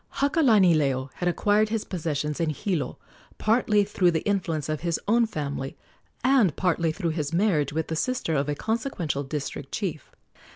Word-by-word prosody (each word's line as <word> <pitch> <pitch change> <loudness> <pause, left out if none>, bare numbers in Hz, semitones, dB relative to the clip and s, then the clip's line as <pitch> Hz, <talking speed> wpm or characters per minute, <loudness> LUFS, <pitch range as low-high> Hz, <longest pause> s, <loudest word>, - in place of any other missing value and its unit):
Hakalanileo 180 - +3
had 175 - 0
acquired 210 +4 +2
his 225 -1 -2
possessions 150 -4 -3
in 165 -2 +1
Hilo 155 +1 -2 0.4
partly 215 -2 +3
through 195 -3 +2
the 165 -2 0
influence 175 -7 -1
of 155 -1 -2
his 170 -2 -1
own 230 +2 +4
family, 140 -7 -4 0.5
and 250 - +4
partly 170 -3 +1
through 170 0 -2
his 155 -1 -3
marriage 170 -7 +2
with 160 +2 -1
the 160 - -4
sister 250 -2 -1
of 140 0 0
a 145 - 0
consequential 220 - -2
district 140 -1 -5
chief. 175 -9 -4
170 Hz, 160 wpm, -26 LUFS, 150-210 Hz, 0.5 s, own